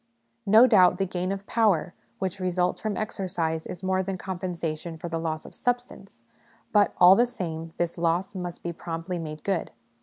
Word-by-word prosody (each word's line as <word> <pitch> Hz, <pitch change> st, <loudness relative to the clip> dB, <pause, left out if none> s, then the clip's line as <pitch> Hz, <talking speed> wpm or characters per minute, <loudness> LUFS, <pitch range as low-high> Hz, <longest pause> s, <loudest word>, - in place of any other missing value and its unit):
No 220 Hz, +5 st, +8 dB
doubt 185 Hz, -7 st, +5 dB
the 195 Hz, -, +1 dB
gain 180 Hz, 0 st, -2 dB
of 195 Hz, 0 st, -4 dB
power 205 Hz, -8 st, +2 dB, 0.2 s
which 190 Hz, 0 st, -3 dB
results 180 Hz, -1 st, 0 dB
from 215 Hz, -3 st, -2 dB
exercise 180 Hz, -7 st, -2 dB
is 175 Hz, -, -8 dB
more 190 Hz, 0 st, +1 dB
than 190 Hz, 0 st, -3 dB
com 185 Hz, 0 st, -5 dB
pensation 165 Hz, -2 st, -4 dB
for 175 Hz, -, -5 dB
the 165 Hz, 0 st, -2 dB
loss 160 Hz, -1 st, -3 dB
of -, -, -11 dB
substance; 245 Hz, -, -3 dB, 0.5 s
but, 205 Hz, -2 st, +3 dB
all 180 Hz, +1 st, +8 dB
the 240 Hz, +4 st, +4 dB
same, 165 Hz, -9 st, -5 dB
this 170 Hz, -1 st, -2 dB
loss 170 Hz, +3 st, 0 dB
must 180 Hz, -3 st, -6 dB
be 170 Hz, -, -3 dB
promptly 170 Hz, +1 st, -5 dB
made 155 Hz, -2 st, -7 dB
good. 195 Hz, -4 st, -1 dB
180 Hz, 185 wpm, -26 LUFS, 165-195 Hz, 0.5 s, No